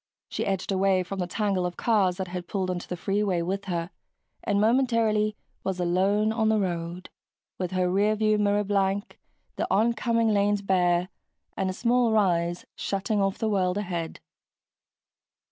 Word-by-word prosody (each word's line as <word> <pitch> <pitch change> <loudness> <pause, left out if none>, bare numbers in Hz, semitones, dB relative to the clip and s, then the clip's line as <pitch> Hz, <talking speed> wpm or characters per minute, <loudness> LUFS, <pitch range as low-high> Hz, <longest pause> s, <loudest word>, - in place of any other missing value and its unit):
She - - -3
edged 195 0 -1
away 190 -1 +2
from 195 +2 -6
the 180 - -1
tangle 195 -1 0
of 180 0 -3
cars 195 -6 +2
that 190 -2 -4
had 180 -1 -5
pulled 190 -2 -1
onto 175 -1 -5
the 180 - -4
freeway 195 -2 0
with 195 +3 -3
her 175 -1 -3 0.5
and 205 -2 +1
momentarily 220 -2 +2 0.3
was 190 -1 -2
alone 195 +5 +2
on 220 -1 +1
the 220 - +3
road, 175 -2 -3 0.5
with 180 -1 -1
her 185 -1 +1
rear 200 +4 +2
view 215 0 +2
mirror 205 0 +2
blank, 200 +1 -1 0.4
the - - -1
oncoming 230 +1 +2
lanes 205 -1 +2
bare, 180 -2 +2 0.5
and 190 - -1
a - - -2
small 240 +2 +2
rise 175 -5 +1
shutting 200 +1 -1
off 195 -1 0
the 220 - -1
world 185 -3 +1
ahead. 175 -5 -4
195 Hz, 160 wpm, -26 LUFS, 180-210 Hz, 0.5 s, the